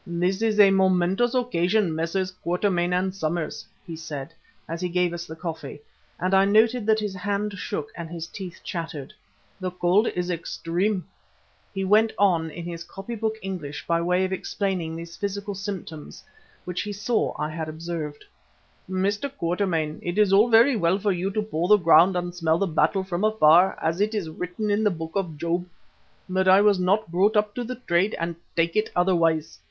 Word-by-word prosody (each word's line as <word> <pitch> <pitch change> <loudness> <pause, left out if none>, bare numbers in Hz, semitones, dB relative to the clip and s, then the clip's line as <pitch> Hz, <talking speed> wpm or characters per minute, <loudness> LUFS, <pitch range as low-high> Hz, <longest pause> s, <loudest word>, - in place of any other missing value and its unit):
"This 180 +3 -1
is 220 -2 +1
a 200 -1 +8
momentous 190 +5 +2
occasion, 210 -6 +1
Messrs. 170 +4 -1
Quatermain 180 0 -1
and 185 +1 0
Somers," 170 -3 -3 0.2
he 170 -3 -7
said 155 -1 -7 0.3
as 165 +2 -5
he 180 - -1
gave 180 0 +1
us 175 0 -6
the 160 - -8
coffee, 160 -4 -6 0.4
and 185 +2 0
I 190 0 +6
noted 220 +3 +3
that 220 0 +4
his 210 -2 -3
hand 200 +2 -2
shook 155 -5 -4
and 170 -1 -7
his 165 -1 -5
teeth 180 0 -9
chattered. 160 -3 -5 0.5
"The 185 -1 -2
cold 180 +4 +2
is 180 0 -2
extreme," 175 +3 -2 0.7
he 195 -1 -3
went 215 +3 +4
on 170 -5 +2
in 170 +2 -8
his 170 -1 -6
copybook 220 +4 -4
English 175 -7 -5
by 170 0 +1
way 180 +2 +2
of 185 - -3
explaining 185 -4 -2
these 170 +1 -8
physical 200 0 -4
symptoms 190 -6 -7 0.4
which 180 0 -3
he 205 +2 -4
saw 215 +3 -1
I 150 - -1
had 160 0 -4
observed. 155 -2 -6 0.6
"Mr. 200 +8 -1
Quatermain, 170 - -1
it 175 +2 -4
is 210 -2 +4
all 210 +5 +5
very 235 +4 +6
well 180 -2 +2
for 205 0 0
you 185 +1 -1
to 210 +2 -1
paw 175 -5 -2
the 210 +2 +7
ground 170 +1 +5
and 175 0 -2
smell 165 -2 +1
the 200 - +1
battle 165 +3 +1
from 185 0 -3
afar, 185 -4 +5
as 165 +4 -1
is 205 -6 -1
written 180 +6 -3
in 205 +2 +1
the 210 - +4
Book 165 -3 -5
of 180 -6 -2
Job. 170 +3 -2 0.6
But 190 0 0
I 190 +1 +7
was 205 -2 +4
not 185 0 +1
brought 200 +5 +3
up 210 0 +1
to 245 - -3
the 250 +2 -5
trade 195 -3 0
and 170 0 -2 0.2
take 165 0 +1
it 215 0 +1
otherwise. 165 -3 +1
180 Hz, 185 wpm, -25 LUFS, 170-205 Hz, 0.7 s, a